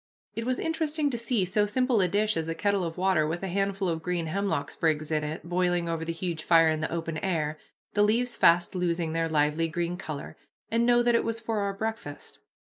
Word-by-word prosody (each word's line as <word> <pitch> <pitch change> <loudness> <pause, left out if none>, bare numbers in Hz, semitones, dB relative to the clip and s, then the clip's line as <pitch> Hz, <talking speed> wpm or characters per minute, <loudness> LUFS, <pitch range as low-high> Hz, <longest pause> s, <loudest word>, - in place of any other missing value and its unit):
It 230 +1 -4
was 255 0 +1
interesting 315 -2 -1
to 240 - -2
see 230 -4 0
so 205 +3 +1
simple 250 0 +2
a 185 - +3
dish 210 +4 +1
as 165 0 -2
a 165 - -2
kettle 200 +2 +1
of 165 0 -4
water 185 -4 +2
with 170 +4 -3
a - - -1
handful 195 +1 -1
of 165 -2 -1
green 175 0 -2
hemlock 175 -4 -1
sprigs 155 -1 0
in 155 -1 +1
it 150 +1 -5
boiling 175 -1 +1
over 165 -1 -2
the 165 - -2
huge 165 -1 -4
fire 165 -1 +5
in 155 0 -1
the 155 - -2
open 165 -1 -3
air, 155 -5 -1 0.3
the 205 - +2
leaves 235 +3 +2
fast 175 +1 +4
losing 170 -3 -1
their 165 0 0
lively 150 +1 +1
green 175 +2 -2
color, 155 -6 -6 0.4
and 230 +1 +2
know 240 0 +5
that 240 0 +3
it 230 - +3
was 230 0 -2
for 225 -1 -2
our 200 -1 -1
breakfast. 220 -8 -6
180 Hz, 230 wpm, -27 LUFS, 165-215 Hz, 0.4 s, fire